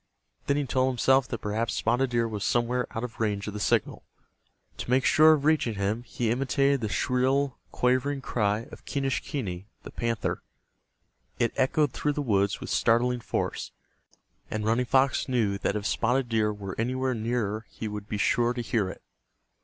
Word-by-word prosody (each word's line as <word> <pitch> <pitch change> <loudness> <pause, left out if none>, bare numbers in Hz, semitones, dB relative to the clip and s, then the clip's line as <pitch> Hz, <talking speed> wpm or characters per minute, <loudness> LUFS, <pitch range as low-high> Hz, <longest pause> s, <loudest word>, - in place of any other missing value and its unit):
Then 140 - +2
he 145 - 0
told 130 0 +1
himself 130 +1 +3
that 120 - -3
perhaps 110 +2 -1
Spotted 120 +3 +1
Deer 120 -1 +1
was 105 -3 -4
somewhere 120 +1 +1
out 115 - -5
of 120 -2 -6
range 105 -3 -1
of 105 - -5
the 105 - -5
signal. - - 0 0.7
To - - -6
make 130 +1 +3
sure 155 +1 +7
of 145 -2 -1
reaching 150 -8 +2
him, 100 +3 -1
he 120 -2 -2
imitated 135 +2 +1
the 110 - -2
shrill 130 +4 +1
quavering 130 +3 +1
cry 105 -5 0
of - - -11
Quenischquney, 130 -8 -3 0.2
the - - -9
panther. 115 -2 -2 1.0
It 120 - +1
echoed 145 +2 +2
through 150 - 0
the 145 - -2
woods 100 -5 +1
with - - -6
startling 120 +2 +2
force, - - -3 0.8
and 105 0 -3
Running 115 +3 +2
Fox 135 +1 +2
knew 110 -6 +1
that 100 - -1
if 105 -1 -3
Spotted 125 +3 +1
Deer 110 -2 +2
were 100 -2 -6
anywhere 130 +2 0
near 110 -1 -2
he 110 - -6
would 105 0 -6
be 105 - -2
sure 120 +3 +2
to 125 - -3
hear 110 -4 0
it. - - -10
120 Hz, 175 wpm, -27 LUFS, 110-130 Hz, 1.0 s, sure